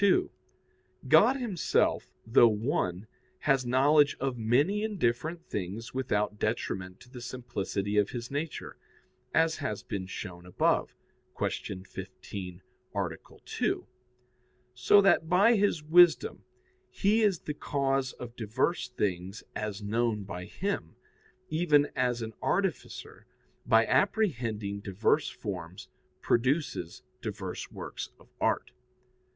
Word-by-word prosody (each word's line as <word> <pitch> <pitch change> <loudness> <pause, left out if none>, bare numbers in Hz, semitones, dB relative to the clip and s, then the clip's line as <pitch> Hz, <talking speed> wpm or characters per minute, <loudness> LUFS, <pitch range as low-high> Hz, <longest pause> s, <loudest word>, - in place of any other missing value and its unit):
2: 370 - +2 0.8
God 265 - +6
Himself, 235 -10 0
though 115 +1 +6
one, 105 - -1 0.4
has 135 -3 +2
knowledge 145 +4 +4
of 135 -1 -1
many 140 - +2
and 215 -2 -2
different 160 +5 -1
things 105 +4 -5
without 105 -5 -1
detriment 95 -4 -2
to - - -16
the 125 -1 -10
simplicity 115 -5 -3
of 105 -1 +3
His 120 0 -6
nature, 145 +2 -4 0.5
as 160 0 +3
has 105 - -3
been 95 -2 -4
shown 90 -2 -7
above 90 - +1 0.4
(Q. 95 -1 -3
15, 95 -1 -8 0.3
A. - - +1 0.4
2); - - -1 0.9
so 200 +11 +5
that 195 -5 +3
by 205 +6 +5
His 200 -7 +1
wisdom 175 - +5 0.4
He 210 +3 +2
is 200 -6 +2
the 150 - -4
cause 135 -3 -1
of 120 -1 -9
diverse 125 +6 -1
things 95 -4 -3
as 105 -1 -4
known 110 0 0
by 90 -2 -6
Him, 195 - -3 0.6
even 155 -3 +3
as 125 -2 0
an 110 0 -6
artificer, - - -2 0.4
by 115 0 +5
apprehending 115 - 0
diverse 105 +9 +1
forms, 90 -4 -7 0.3
produces 125 - 0 0.2
diverse - - -5
works - - -6
of - - -21
art. - - +1
120 Hz, 120 wpm, -29 LUFS, 105-155 Hz, 0.9 s, God